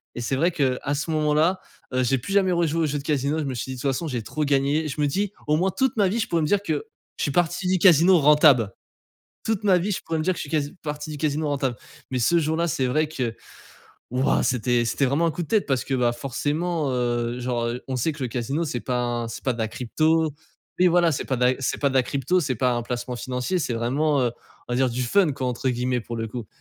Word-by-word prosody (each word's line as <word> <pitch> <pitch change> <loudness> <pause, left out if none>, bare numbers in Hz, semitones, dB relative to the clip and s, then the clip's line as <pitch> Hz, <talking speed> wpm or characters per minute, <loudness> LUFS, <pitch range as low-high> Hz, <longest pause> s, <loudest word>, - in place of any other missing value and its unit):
et 120 - -4
c'est 125 +3 -1
vrai 165 +6 +3
qu'à 140 -2 0
ce 150 +3 -3
moment-là, 155 +4 +2 0.3
heu, 130 - +2
j'ai 135 +2 +2
plus 130 +11 -5
jamais 195 -2 +3
rejouer 165 -2 +1
aux - - +2
jeux 145 0 -2
de 140 - -6
casino, 145 0 0
je - - -1
me 135 -2 -3
suis 130 +2 -4
dit: - - -6
«De - - -7
toute 140 - +1
façon 160 +6 -3
j'ai 125 -6 -3
trop 155 +7 -3
gagné». 145 +2 +1
Je 150 - -5
me - - +3
dis: 195 +7 -1
«Au 150 - +3
moins 180 +5 +2
toute 265 +6 0
ma 205 -2 +4
vie 210 +5 -1
je - - -1
pourrais 170 -1 +1
me 155 - +1
dire 200 +4 +2
que 155 -6 -1 0.3
je - - -2
suis 145 - 0
parti 175 +4 0
du 185 +1 +3
casino 175 0 +6
rentable. 145 -7 +5 0.7
Toute 220 -2 -1
ma 190 -3 +5
vie, 185 +4 -1
je - - -4
pourrais 165 0 -2
me 155 - -1
dire 185 - +2
que - - -10
je - - -2
suis 145 - -7
casi 145 0 -1
parti 150 0 -5
du 150 - -6
casino 150 +1 -1
rentable». 135 -4 -1 0.3
Mais 130 - 0
ce 170 +9 +3
jour 160 0 0
là 170 +1 +1
c'est 135 -4 0
vrai 155 +5 +1
que 125 -7 -3 0.8
wouah, 130 +2 +2
c'était 120 -1 +1
c'était 135 +4 +1
vraiment 145 +6 +1
un - - +2
coup 175 - -4
de 160 - -7
tête 215 -3 +2
parce 135 -3 0
que, 135 - -2
bah, 120 -2 +2
forcément, 145 +5 -2
heu, 120 -1 -1
genre, 120 -1 -1
heu, 120 +1 -4
on 130 - -2
sait 125 +6 0
que 150 -2 -8
le 125 - -1
casino 130 +7 -2
c'est 125 -6 -3
pas 125 0 -1 0.2
un 115 - -4
c'est 115 - -7
pas 130 - +2
de - - -11
la 110 -1 -1
crypto, 155 +7 +1 0.5
oui 180 - +5
voilà, 175 -1 +4
c'est 135 - -2
pas 130 - -1
de 125 - +1
la 125 - +4
c'est 135 - -1
pas 140 - +2
de - - -6
la 130 - +5
crypto, 140 +8 0
c'est 140 -5 -1
pas 125 +2 +1
un 120 - -2
placement 125 +1 -4
financier, 125 +9 -2
c'est, 140 -7 -2
vraiment, 140 +6 +1
heu, 120 -2 0 0.4
on - - -3
va - - 0
dire 130 0 +2
«du 125 +2 -2
fun 160 +6 +3
quoi» 130 -1 -3
entre 125 +1 -2
guillemets 125 0 0
pour 115 +1 -6
le 115 0 -3
coup. 115 0 -6
140 Hz, 280 wpm, -24 LUFS, 125-165 Hz, 0.8 s, casino